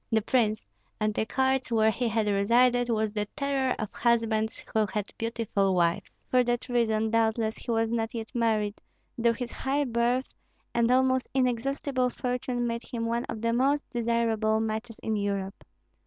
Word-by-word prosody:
The 220 Hz, -1 st, +2 dB
prince, 220 Hz, -3 st, +1 dB, 0.3 s
at 215 Hz, -1 st, +1 dB
the 220 Hz, -, -1 dB
courts 265 Hz, -1 st, +1 dB
where 220 Hz, -1 st, +4 dB
he 240 Hz, +2 st, -1 dB
had 220 Hz, -1 st, +1 dB
resided, 240 Hz, +5 st, +3 dB
was 220 Hz, -2 st, +1 dB
the 210 Hz, -1 st, -2 dB
terror 275 Hz, -2 st, 0 dB
of 215 Hz, -, -5 dB
husbands 225 Hz, -2 st, 0 dB
who 220 Hz, -1 st, +2 dB
had 210 Hz, -2 st, -3 dB
beautiful 225 Hz, -4 st, 0 dB
wives. 170 Hz, -1 st, +1 dB, 0.2 s
For 255 Hz, 0 st, +5 dB
that 240 Hz, 0 st, -1 dB
reason, 220 Hz, -2 st, +1 dB
doubtless, 225 Hz, -1 st, +1 dB
he -, -, -11 dB
was 225 Hz, -1 st, +1 dB
not 230 Hz, 0 st, -1 dB
yet 225 Hz, +1 st, -6 dB
married, 215 Hz, -4 st, 0 dB, 0.3 s
though 235 Hz, 0 st, +2 dB
his 240 Hz, 0 st, -5 dB
high 280 Hz, +2 st, -1 dB
birth 245 Hz, +1 st, +1 dB, 0.5 s
and 235 Hz, 0 st, +2 dB
almost 260 Hz, 0 st, +3 dB
inexhaustible 255 Hz, +1 st, 0 dB
fortune 245 Hz, 0 st, -2 dB
made 235 Hz, 0 st, -2 dB
him 230 Hz, -2 st, -4 dB
one 235 Hz, +1 st, -1 dB
of 220 Hz, 0 st, -6 dB
the 230 Hz, 0 st, +2 dB
most 275 Hz, +4 st, +1 dB
desirable 230 Hz, -2 st, +1 dB
matches 220 Hz, +1 st, -3 dB
in 220 Hz, -, 0 dB
Europe. 200 Hz, -1 st, -3 dB
230 Hz, 170 wpm, -28 LUFS, 220-245 Hz, 0.5 s, For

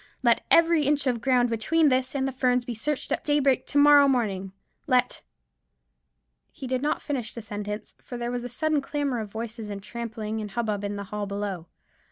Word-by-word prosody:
Let 235 Hz, -2 st, +3 dB
every 330 Hz, -2 st, +5 dB
inch 290 Hz, 0 st, +1 dB
of 245 Hz, -3 st, 0 dB
ground 250 Hz, -3 st, +2 dB
between 300 Hz, +8 st, +2 dB
this 255 Hz, +1 st, 0 dB
and 270 Hz, -1 st, 0 dB
the -, -, -2 dB
Ferns 250 Hz, -1 st, +1 dB
be 240 Hz, -, -4 dB
searched 280 Hz, +6 st, -3 dB
at -, -, -1 dB
daybreak 285 Hz, -3 st, +2 dB
to 285 Hz, -, -1 dB
morrow 285 Hz, 0 st, +7 dB
morning; 200 Hz, -8 st, 0 dB, 0.4 s
let——" 250 Hz, -2 st, +2 dB, 1.3 s
He -, -, -9 dB
did 255 Hz, 0 st, -1 dB
not 295 Hz, +1 st, -1 dB
finish 255 Hz, -7 st, -3 dB
the 235 Hz, -, -5 dB
sentence, 210 Hz, 0 st, -6 dB
for 245 Hz, -, -7 dB
there 240 Hz, 0 st, -3 dB
was 245 Hz, -1 st, -3 dB
a 245 Hz, -, -5 dB
sudden 305 Hz, +4 st, 0 dB
clamour 280 Hz, -3 st, -2 dB
of 215 Hz, -2 st, -5 dB
voices, 225 Hz, 0 st, -6 dB
and 200 Hz, -1 st, -6 dB
trampling, 220 Hz, -1 st, -5 dB
and 210 Hz, -, -5 dB
hubbub 210 Hz, -1 st, -2 dB
in 205 Hz, 0 st, -3 dB
the 200 Hz, -, -5 dB
hall 210 Hz, -1 st, -2 dB
below. 200 Hz, -4 st, -4 dB
245 Hz, 200 wpm, -26 LUFS, 215-275 Hz, 1.3 s, morrow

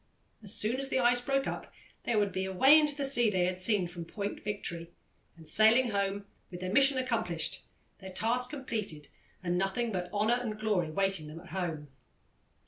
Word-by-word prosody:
As 205 Hz, -3 st, -6 dB
soon 225 Hz, +3 st, 0 dB
as 270 Hz, 0 st, -1 dB
the -, -, 0 dB
ice 245 Hz, -1 st, +4 dB
broke 275 Hz, +2 st, 0 dB
up -, -, -5 dB, 0.3 s
they 235 Hz, -, 0 dB
would 205 Hz, -2 st, +2 dB
be 190 Hz, 0 st, -2 dB
away 265 Hz, +11 st, +6 dB
into 300 Hz, -2 st, +2 dB
the 280 Hz, -1 st, -1 dB
sea 240 Hz, -4 st, +5 dB
they 185 Hz, -3 st, +1 dB
had 180 Hz, 0 st, -2 dB
seen 190 Hz, 0 st, +1 dB
from 175 Hz, 0 st, -7 dB
Point 200 Hz, +4 st, -5 dB
Victory, 170 Hz, -5 st, -4 dB, 0.5 s
and 160 Hz, -1 st, -13 dB
sailing 220 Hz, +8 st, +4 dB
home 200 Hz, 0 st, -1 dB, 0.2 s
with 175 Hz, -, -8 dB
their 185 Hz, +1 st, -3 dB
mission 275 Hz, +1 st, +5 dB
accomplished, 230 Hz, -10 st, -2 dB, 0.4 s
their 190 Hz, -1 st, -9 dB
task 240 Hz, +6 st, -1 dB
completed, 215 Hz, -, -5 dB, 0.3 s
and 175 Hz, 0 st, 0 dB
nothing 210 Hz, +5 st, -1 dB
but 180 Hz, -2 st, -4 dB
honour 215 Hz, +4 st, +1 dB
and 215 Hz, -3 st, -5 dB
glory 205 Hz, -7 st, 0 dB
waiting 195 Hz, -1 st, -1 dB
them 155 Hz, +2 st, -9 dB
at 180 Hz, +1 st, -14 dB
home. 165 Hz, -5 st, -4 dB
205 Hz, 190 wpm, -30 LUFS, 180-240 Hz, 0.5 s, away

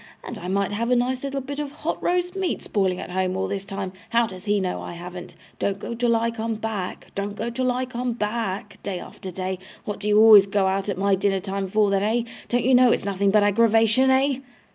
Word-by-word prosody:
And -, -, -7 dB
I 175 Hz, -, -7 dB
might 195 Hz, +1 st, 0 dB
have 230 Hz, +3 st, -1 dB
a 250 Hz, -, +4 dB
nice 250 Hz, +2 st, 0 dB
little 275 Hz, 0 st, -2 dB
bit 280 Hz, +2 st, -6 dB
of 290 Hz, -2 st, -3 dB
hot 295 Hz, -, -4 dB
roast 360 Hz, +1 st, 0 dB
meat 380 Hz, -2 st, -2 dB
spoiling 190 Hz, -3 st, 0 dB
at -, -, -7 dB
home 185 Hz, 0 st, -1 dB
all 190 Hz, 0 st, -1 dB
this 195 Hz, 0 st, -4 dB
time 195 Hz, -1 st, -5 dB, 0.2 s
how 235 Hz, +1 st, +3 dB
does 185 Hz, -2 st, -9 dB
HE 205 Hz, -1 st, +2 dB
know 185 Hz, -2 st, -2 dB
I -, -, -7 dB
haven't? 175 Hz, +1 st, -9 dB, 0.2 s
"Don't 195 Hz, -1 st, 0 dB
go 215 Hz, -, -6 dB
till 235 Hz, 0 st, +2 dB
I 230 Hz, +1 st, +1 dB
come 225 Hz, 0 st, -3 dB
back," 215 Hz, -4 st, -5 dB
"Don't 200 Hz, +1 st, -3 dB
go 230 Hz, +2 st, -3 dB
till 255 Hz, +1 st, 0 dB
I 255 Hz, +1 st, -1 dB
come 250 Hz, -1 st, -3 dB
back," 210 Hz, -2 st, -3 dB
day 190 Hz, -3 st, -4 dB
after 190 Hz, -, -9 dB
day. 185 Hz, 0 st, -4 dB, 0.3 s
What 210 Hz, -, -4 dB
do 205 Hz, -, -4 dB
you 210 Hz, 0 st, +5 dB
always 215 Hz, -3 st, +9 dB
go 195 Hz, 0 st, +1 dB
out 195 Hz, +1 st, 0 dB
at 190 Hz, -, -2 dB
my 200 Hz, +1 st, +2 dB
dinner 195 Hz, 0 st, +1 dB
time 195 Hz, 0 st, -3 dB
for 210 Hz, +1 st, +2 dB
then 195 Hz, -1 st, +2 dB
eh? 225 Hz, +3 st, +1 dB, 0.3 s
Don't 245 Hz, -1 st, +1 dB
you 260 Hz, -, +4 dB
know 250 Hz, -1 st, +6 dB
it's -, -, 0 dB
nothing 200 Hz, 0 st, +1 dB
but 210 Hz, +1 st, +4 dB
aggravation 225 Hz, +4 st, +4 dB
eh? 265 Hz, 0 st, +3 dB
210 Hz, 245 wpm, -24 LUFS, 195-240 Hz, 0.3 s, always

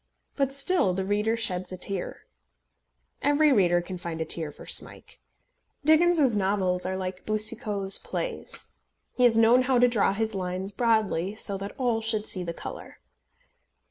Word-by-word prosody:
But 275 Hz, -1 st, 0 dB
still 275 Hz, -, +1 dB
the 190 Hz, 0 st, -2 dB
reader 210 Hz, +3 st, 0 dB
sheds 185 Hz, -5 st, -2 dB
a 185 Hz, -, -6 dB
tear. 190 Hz, 0 st, -4 dB, 1.0 s
Every 290 Hz, +2 st, +3 dB
reader 175 Hz, -7 st, +3 dB
can 180 Hz, 0 st, -7 dB
find 170 Hz, -2 st, -6 dB
a 160 Hz, -, -2 dB
tear 160 Hz, -1 st, -1 dB
for -, -, -13 dB
Smike. -, -, -1 dB, 0.7 s
Dickens's 315 Hz, -5 st, +5 dB
novels 190 Hz, -2 st, +1 dB
are 190 Hz, 0 st, -2 dB
like 185 Hz, 0 st, -5 dB
Boucicault's 215 Hz, -2 st, -2 dB
plays. -, -, -5 dB, 0.5 s
He 250 Hz, -, +3 dB
has 230 Hz, -2 st, +4 dB
known 230 Hz, +3 st, +5 dB
how 255 Hz, 0 st, +1 dB
to 245 Hz, +1 st, +5 dB
draw 220 Hz, -5 st, +1 dB
his 220 Hz, +1 st, -2 dB
lines 185 Hz, 0 st, -4 dB
broadly, 210 Hz, -4 st, 0 dB
so 205 Hz, -2 st, -3 dB
that 200 Hz, +1 st, -7 dB
all 240 Hz, -4 st, 0 dB
should 220 Hz, -1 st, -1 dB
see 185 Hz, -, +3 dB
the 170 Hz, -, -4 dB
colour. -, -, -9 dB
210 Hz, 160 wpm, -26 LUFS, 185-240 Hz, 1.0 s, Dickens's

